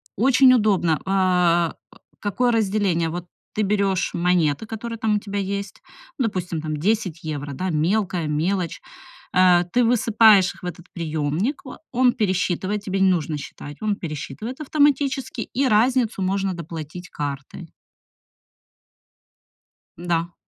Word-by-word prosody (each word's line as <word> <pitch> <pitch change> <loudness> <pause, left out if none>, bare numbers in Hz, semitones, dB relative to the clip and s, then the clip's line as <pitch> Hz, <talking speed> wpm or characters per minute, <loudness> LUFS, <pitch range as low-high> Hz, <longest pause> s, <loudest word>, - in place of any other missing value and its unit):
очень 255 +3 +5
удобно. 195 -9 +2
А, 180 -3 +2 0.2
э, - - -18 0.2
какое 240 +5 0
разделение? 200 -6 +1
Вот 175 +2 -5 0.3
ты 215 - 0
берёшь 195 -2 0
монеты, 175 -1 +1
которые 230 +1 -5
там 220 -1 +1
у - - +1
тебя 200 -1 -4
есть, 200 0 -4 0.4
ну 255 - +2
допустим, 180 -5 -3
там 155 -1 -3
10 185 -1 -1
евро, 145 -2 -4
да, 185 +7 -3
мелкая 175 +1 0
мелочь. 170 +4 -1 0.5
Э, 180 -1 +5
ты 245 - +4
высыпаешь 220 -4 +5
их - - -19
в - - -5
этот 175 -1 -7
приемник, 160 - -2
а, 255 - -9
он 250 0 +3
пересчитывает, 190 0 -1
тебе 195 0 -1
не 190 - +5
нужно 160 -4 0
считать, 145 0 -9
он 215 -1 0
пересчитывает 170 - -6
автоматически, 285 -4 +1 0.2
и 275 0 +3
разницу 230 -1 +2
можно 195 0 0
доплатить 170 +1 -8
картой. 140 +3 -6 2.3
М-да. 170 0 -2
190 Hz, 135 wpm, -22 LUFS, 170-220 Hz, 2.3 s, очень